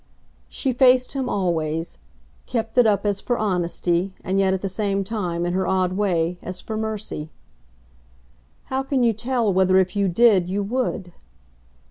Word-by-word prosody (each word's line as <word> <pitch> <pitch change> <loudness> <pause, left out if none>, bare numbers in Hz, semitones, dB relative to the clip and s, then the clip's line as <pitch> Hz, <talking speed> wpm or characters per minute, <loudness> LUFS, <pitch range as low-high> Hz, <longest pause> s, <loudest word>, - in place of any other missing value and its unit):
She 265 -2 -1
faced 255 0 +4
him 265 -2 -2
always 165 - -2 0.5
kept 225 -2 -3
it 240 - +6
up 205 -1 +1
as 200 -1 0
for 245 - -1
honesty, 180 -2 0
and 190 +1 0
yet 190 -1 +3
at 190 0 -2
the - - 0
same 195 0 -1
time, 180 -5 -2
in 175 - -1
her 185 0 0
odd 185 -1 +1
way, 180 -3 0
as 185 - -6
for 220 - -6
mercy. 215 -8 -4 1.4
"How 265 - +1
can 270 -1 0
you 230 -1 +3
tell 235 -1 0
whether 185 0 +4
if 185 +1 +2
you 200 -1 +2
did 190 -2 +4
you 200 +2 -1
would?" 205 -5 -2
195 Hz, 165 wpm, -23 LUFS, 180-225 Hz, 1.4 s, it